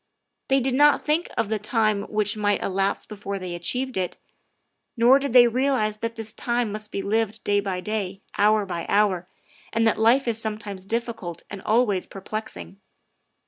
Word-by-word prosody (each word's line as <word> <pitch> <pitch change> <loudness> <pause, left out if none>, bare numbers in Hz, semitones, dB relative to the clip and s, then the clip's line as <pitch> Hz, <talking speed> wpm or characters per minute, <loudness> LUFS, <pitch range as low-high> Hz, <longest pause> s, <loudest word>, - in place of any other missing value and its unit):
They 270 0 +3
did 260 0 -1
not 290 +2 +4
think 310 +3 +1
of 230 - +1
the 220 0 -1
time 215 -1 +1
which 210 0 0
might 205 -1 +1
elapse 195 +1 0
before 200 -2 -5
they 185 -2 -5
achieved 250 +9 -3
it; 180 -2 -2 0.8
nor 245 +4 +6
did 280 -1 -3
they 240 0 +8
realize 235 -3 +1
that 230 +1 -4
this 225 -1 -6
time 240 -2 -1
must 215 0 -5
be 195 - -3
lived 220 +1 -1
day 205 0 +2
by 190 -2 -3
day, 200 -2 -4
hour 210 0 +3
by 170 -3 -5
hour, 195 -4 +2 0.4
and 225 0 +1
that 225 - +2
life 245 +4 +4
is 225 -1 -1
sometimes 210 -3 -5
difficult 225 -6 -4
and 195 - -6
always 215 -4 +1
perplexing. 100 - -7
215 Hz, 175 wpm, -24 LUFS, 200-235 Hz, 0.8 s, they